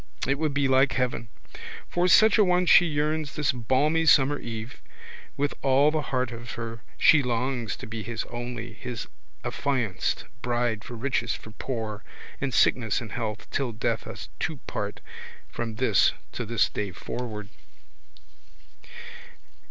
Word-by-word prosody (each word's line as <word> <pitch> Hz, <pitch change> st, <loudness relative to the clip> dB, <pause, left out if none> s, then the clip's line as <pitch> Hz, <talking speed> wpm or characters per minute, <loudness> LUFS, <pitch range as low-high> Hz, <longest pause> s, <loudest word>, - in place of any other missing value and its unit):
It 140 Hz, +2 st, 0 dB
would 155 Hz, -3 st, 0 dB
be 140 Hz, -1 st, +2 dB
like 130 Hz, -1 st, +4 dB
heaven. 125 Hz, -2 st, -1 dB, 0.6 s
For 175 Hz, +1 st, +1 dB
such 220 Hz, +4 st, +6 dB
a -, -, +8 dB
one 180 Hz, -1 st, +3 dB
she 175 Hz, 0 st, +7 dB
yearns 150 Hz, -1 st, -1 dB
this 150 Hz, +1 st, +2 dB
balmy 140 Hz, +7 st, +1 dB
summer 140 Hz, 0 st, +5 dB
eve. 115 Hz, +2 st, -7 dB, 0.6 s
With 145 Hz, 0 st, 0 dB
all 140 Hz, +2 st, +4 dB
the 155 Hz, -1 st, 0 dB
heart 130 Hz, -3 st, -1 dB
of 120 Hz, +1 st, -7 dB
her 115 Hz, -1 st, -6 dB, 0.2 s
she 160 Hz, -, +6 dB
longs 125 Hz, -3 st, -1 dB
to -, -, -9 dB
be 110 Hz, 0 st, -5 dB
his 115 Hz, +1 st, -3 dB
only, 120 Hz, -1 st, -6 dB
his 120 Hz, -3 st, -6 dB, 0.4 s
affianced 125 Hz, -9 st, -1 dB, 0.2 s
bride 120 Hz, -2 st, 0 dB
for 120 Hz, -, -8 dB
riches 120 Hz, -1 st, -1 dB
for 110 Hz, -, -11 dB
poor, 110 Hz, -3 st, -4 dB, 0.4 s
in 140 Hz, -1 st, -1 dB
sickness 115 Hz, -2 st, +3 dB
in 120 Hz, -4 st, -7 dB
health, 110 Hz, -1 st, -4 dB
till 130 Hz, -4 st, -1 dB
death 110 Hz, -, -1 dB
us -, -, -8 dB
two -, -, -2 dB
part, -, -, -4 dB, 0.5 s
from 115 Hz, -2 st, -4 dB
this 110 Hz, -4 st, +4 dB, 0.2 s
to 120 Hz, -, -4 dB
this 115 Hz, -1 st, +3 dB
day 100 Hz, -2 st, -3 dB
forward. 105 Hz, +1 st, -6 dB
125 Hz, 150 wpm, -27 LUFS, 115-140 Hz, 0.6 s, a